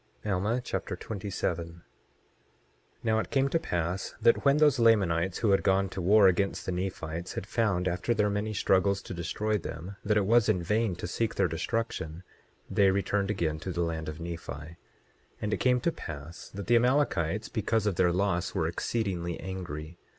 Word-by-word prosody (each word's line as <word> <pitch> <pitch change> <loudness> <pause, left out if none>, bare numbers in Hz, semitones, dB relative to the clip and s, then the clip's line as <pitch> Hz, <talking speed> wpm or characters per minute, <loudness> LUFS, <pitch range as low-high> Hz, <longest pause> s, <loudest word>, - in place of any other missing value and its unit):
Alma 105 +4 0
Chapter 125 - -3
27 95 -5 -3
27:1 85 +1 -14 1.2
Now 110 -1 +2
it - - -3
came 135 -1 +2
to 165 - +1
pass 90 - -2
that 115 +1 +4
when 140 +1 +5
those 150 -4 +4
Lamanites 95 -6 +3
who 110 -4 +2
had 95 - +4
gone 95 0 +2
to 95 - -5
war 100 +3 +6
against 95 +2 +1
the - - -2
Nephites 90 -2 -4
had - - -4
found, 100 -5 0
after 90 +7 0
their 105 -1 +2
many 105 +2 -1
struggles 100 -1 +2
to - - -7
destroy 105 +5 -1
them, 90 +4 -7
that 105 0 +2
it 100 - +2
was 115 +1 +4
in 90 -5 +2
vain 105 +1 +1
to 85 - -6
seek 115 +5 -1
their - - +3
destruction, 85 -1 -3 0.4
they 100 -1 +4
returned 100 +1 0
again 80 -7 -1
to 95 - -5
the 85 - -2
land 80 -2 -3
of 75 - -7
Nephi. 85 0 -6
27:2 75 +4 -8 0.6
And 105 0 -2
it - - +1
came 125 -1 +3
to 170 - +1
pass 80 - -8
that 100 0 -7
the 120 +5 +5
Amalekites, 115 - +1
because 110 -1 0
of 100 -4 0
their 90 -1 +4
loss, 90 -1 0
were - - +1
exceedingly 90 -7 -2
angry. 85 -3 -6
95 Hz, 185 wpm, -29 LUFS, 85-110 Hz, 1.2 s, war